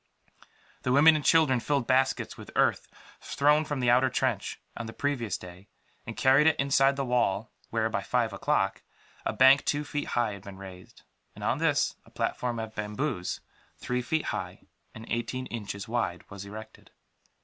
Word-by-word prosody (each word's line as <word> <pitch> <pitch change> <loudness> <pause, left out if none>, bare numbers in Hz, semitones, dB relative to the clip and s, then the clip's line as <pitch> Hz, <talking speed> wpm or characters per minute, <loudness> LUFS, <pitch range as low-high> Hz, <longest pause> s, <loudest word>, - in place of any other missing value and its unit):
The 125 - -1
women 155 +4 +7
and 150 - -1
children 150 -6 +4
filled 140 0 0
baskets 130 +1 +1
with - - -11
the - - -9
earth - - +2 0.3
thrown 150 +2 +2
from 145 -3 -3
the 120 -1 +4
outer 130 +2 +4
trench, - - -1 0.2
on 120 - -5
the 115 - -8
previous 120 -10 -2
day, 90 +2 -12 0.4
and - - -6
carried 135 +4 +5
it 160 - +3
inside 135 0 +3
the 135 -1 -2
wall 115 -4 0 0.2
where, 110 -1 0
by 110 -3 -2
five 115 +1 0
o'clock, 95 0 0 0.5
a - - +1
bank 135 +2 +6
two 145 0 0
feet 145 0 -4
high 120 -3 +2
had 100 - -9
been 95 0 -10
raised; 95 -1 -12 0.3
and - - -9
on - - 0
this - - +1
a - - -20
platform 120 -1 -2
of 110 -1 -5
bamboos, 105 -1 -3 0.4
three 125 0 -2
feet 155 +6 -1
high - - -5 0.3
and 110 - -9
eighteen 130 +2 -3
inches 100 -4 -6
wide 110 -7 -2
was 100 0 -8
erected. 110 +2 -11
120 Hz, 180 wpm, -28 LUFS, 105-135 Hz, 0.5 s, women